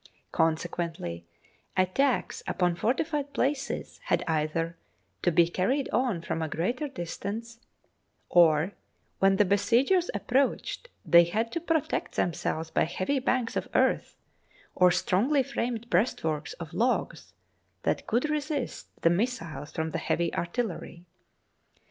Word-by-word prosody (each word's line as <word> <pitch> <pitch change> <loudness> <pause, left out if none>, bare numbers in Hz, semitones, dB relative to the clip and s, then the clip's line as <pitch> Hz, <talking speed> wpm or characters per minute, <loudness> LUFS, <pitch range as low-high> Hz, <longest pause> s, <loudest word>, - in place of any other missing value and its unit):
Consequently 160 - -1 0.5
attacks 235 +9 +1
upon 180 -2 +1
fortified 285 - -1
places 275 +1 -2
had - - +1
either 165 +1 0 0.5
to 175 - +2
be 170 +1 +5
carried 250 +11 0
on 235 -10 0
from 165 - -2
a 160 - -1
greater 240 - -1
distance, 230 +1 -6 0.7
or 165 0 +5 0.5
when 195 0 +5
the 205 - +4
besiegers 240 - +3
ap - - -4
proached 275 - 0 0.2
they 170 0 +7
had 220 +7 -1
to 335 - -1
protect 325 -3 -1
themselves 160 -1 -1
by - - +2
heavy 185 - -1
banks 255 -2 0
of - - -2
earth - - +2 0.6
or 180 -1 +5
strongly 200 +10 +2
framed 235 -2 -3
breastworks 170 -7 0
of 170 -2 -9
logs 240 +7 -1 0.5
that - - -1
would 245 +7 +2
resist 300 -3 -2 0.2
the 165 - +6
missiles 170 - -2
from 160 0 -2
the - - -2
heavy 170 -1 0
artillery. 175 -2 -3
195 Hz, 125 wpm, -28 LUFS, 170-255 Hz, 0.7 s, they